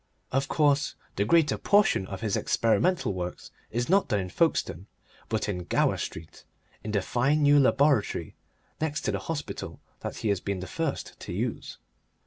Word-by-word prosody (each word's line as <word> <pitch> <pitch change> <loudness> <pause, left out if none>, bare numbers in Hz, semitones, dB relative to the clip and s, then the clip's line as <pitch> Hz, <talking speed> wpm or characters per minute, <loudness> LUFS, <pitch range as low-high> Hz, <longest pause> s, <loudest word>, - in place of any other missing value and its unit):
Of 135 +1 +1
course, 145 -1 +2 0.2
the 100 - +1
greater 160 +5 +3
portion 200 - +3
of 95 0 -6
his 110 -3 0
experimental 140 - +1
work 90 -1 -4 0.3
is 120 +2 -1
not 195 +3 +3
done 105 -4 +1
in 90 -1 -4
Folkestone, 100 - 0 0.4
but 110 -1 -1
in 90 -4 -3
Gower - - +2
Street, 80 +1 -7 0.4
in 110 - -5
the 105 -3 0
fine 140 +8 +1
new 145 0 +6
laboratory 140 -3 +2 0.5
next 155 -1 -1
to - - -1
the - - -2
hospital 155 -3 -5 0.2
that - - -5
he 110 - -1
has 100 -2 +1
been 100 0 -3
the 90 - -5
first 160 - -4
to - - -7
use. - - -3
120 Hz, 170 wpm, -27 LUFS, 100-150 Hz, 0.5 s, new